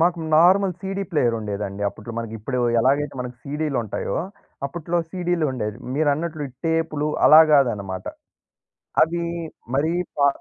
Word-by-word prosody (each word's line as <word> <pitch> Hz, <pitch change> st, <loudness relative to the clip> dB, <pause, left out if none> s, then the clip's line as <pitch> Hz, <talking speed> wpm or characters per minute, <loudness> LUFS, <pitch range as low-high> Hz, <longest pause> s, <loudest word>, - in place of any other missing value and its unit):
మాకు 170 Hz, +1 st, +3 dB, 0.2 s
normal 185 Hz, +2 st, +5 dB
CD 195 Hz, 0 st, -3 dB
player 125 Hz, -8 st, +2 dB
ఉండేదండి. 100 Hz, -1 st, -4 dB
అప్పట్లో 110 Hz, +3 st, -9 dB
మనకిప్పుడు 115 Hz, +2 st, -4 dB, 0.2 s
ఎలాగైతే 140 Hz, +4 st, +1 dB
మనకి 125 Hz, 0 st, -6 dB
సీడీలుంటాయో, 140 Hz, -6 st, -2 dB, 0.5 s
అప్పట్లో 170 Hz, +4 st, -2 dB
సీడీలుండేవి. 155 Hz, -, -1 dB, 0.2 s
మీరన్నట్లు 155 Hz, +1 st, 0 dB
ఈ -, -, -15 dB, 0.2 s
టేప్‌లు 160 Hz, -2 st, 0 dB, 0.2 s
అలా 155 Hz, +1 st, +10 dB
గాదన్నమాట. 100 Hz, -10 st, +1 dB, 1.0 s
అవి 170 Hz, +1 st, -2 dB, 0.5 s
మరీ 155 Hz, +5 st, +1 dB, 0.3 s
కా 140 Hz, -, +6 dB
145 Hz, 115 wpm, -23 LUFS, 115-165 Hz, 1.0 s, అలా